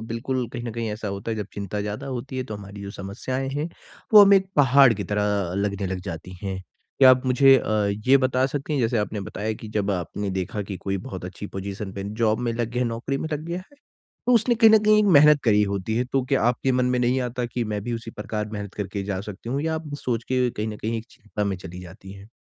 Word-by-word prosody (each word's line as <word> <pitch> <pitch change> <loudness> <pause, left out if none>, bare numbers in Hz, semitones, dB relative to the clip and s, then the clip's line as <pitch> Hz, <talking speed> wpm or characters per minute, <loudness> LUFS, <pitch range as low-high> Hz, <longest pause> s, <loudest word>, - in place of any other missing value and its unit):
बिल्कुल 120 +1 -2
कहीं 120 - -5
न 120 - -3
कहीं 115 -1 -3
ऐसा 105 -1 -5
होता 100 +3 -4
है 110 - -2
जब 105 -2 -4
चिंता 100 0 -4
ज़्यादा 105 +4 -4
होती 130 0 -5
है 130 - -2
तो 110 -4 -6
हमारी 100 0 -10
जो 100 - -6
समस्याएँ 130 +8 -4
हैं, 145 +4 -2 0.5
वो 210 - +12
हमें 200 0 +7
एक 190 0 0
पहाड़ 135 -2 +6
की 100 -1 -4
तरह 105 +2 -1 0.3
अ, 90 - -4
लगने 100 -1 -1
लग 95 0 -3
जाती 85 +1 -6
हैं। 95 -1 -3 0.4
क्या 130 -2 +9
आप 130 +1 +3
मुझे 135 +1 +6
अ, - - -2 0.4
ये 135 +1 +7
बता 130 0 +2
सकते 145 +2 -4
हैं 140 - +1
जैसे 115 0 +1
आपने 105 0 -2
बताया 105 +3 -3
कि 110 - -8
जब 100 -1 +1
आपने 95 +2 -3
देखा 95 +2 -3
कि 95 0 -6
कोई 95 0 0
बहुत 95 -2 -6
अच्छी 95 +3 -7
पोजीशन 95 0 -5
पे 100 -1 -6 0.2
जॉब 110 -1 +3
में 120 -1 -1
लग 115 0 -2
गया 125 +1 -1
है 120 - 0
नौकरी 120 +4 -3
में 160 - -3
लग 150 +1 -3
गया 170 +1 -3
है, 210 +10 -14 0.5
तो 250 - +4
उसने 235 +1 +3
कहीं 225 -1 +7
न 220 - +8
कहीं 215 0 +5
एक 210 - +3
मेहनत 150 0 +6
करी 105 -3 +4
होती 100 +3 -2
है 125 - +1
तो 135 -2 +2
क्या 135 0 +1
आपके 125 +2 +2
मन 125 0 +2
में 125 0 +1
नहीं 125 +2 +2
आता 125 0 -2
कि 120 0 -3
मैं 105 - -2
भी 120 0 -3
उसी 115 0 -6
प्रकार 105 0 -4
मेहनत 100 -2 -6
करके 100 -1 -4
जा 95 -1 -3
सकती 105 +2 -8
हूँ? 140 +3 -1
या 160 0 -1
आप 155 -2 -6
सोच 120 -2 -1
के 125 -1 +1
कहीं 110 -1 -4
न 105 -1 -5
कहीं 115 +1 -2
एक 110 - -7
चिंता 105 0 -5
में 100 -2 -1
चली 90 +1 -9
जाती 95 +2 -11
हैं? 100 +2 -13
115 Hz, 265 wpm, -24 LUFS, 100-130 Hz, 0.5 s, वो